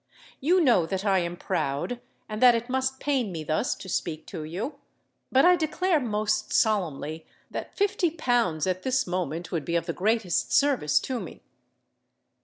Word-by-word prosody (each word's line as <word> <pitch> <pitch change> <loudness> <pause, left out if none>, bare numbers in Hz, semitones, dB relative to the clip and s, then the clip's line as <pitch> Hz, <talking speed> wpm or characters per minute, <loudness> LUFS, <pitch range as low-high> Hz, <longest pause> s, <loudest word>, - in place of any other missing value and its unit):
You 350 +7 +3
know 235 - +4
that 190 +3 -3
I 195 -2 +3
am 175 0 -3
proud, 165 - -2 0.3
and 215 0 -5
that 245 -2 +8
it 235 +2 -3
must 265 0 0
pain 265 -8 0
me 160 -3 -5
thus 155 - 0
to - - -11
speak 160 -3 -3
to 155 - -6
you: 215 - -5 0.5
but 265 +4 +5
I 360 0 +7
declare 335 +1 +1
most 215 -3 -1
solemnly 165 - 0 0.2
that - - -6
fifty 405 -3 +2
pounds 245 - 0
at 185 0 -1
this 260 +2 +1
moment 175 -2 -3
would 165 -4 -1
be 170 - -2
of 170 - +1
the - - -3
greatest 210 -2 0
service 275 - +3
to 255 -2 -3
me." - - -9
215 Hz, 175 wpm, -26 LUFS, 170-265 Hz, 0.5 s, that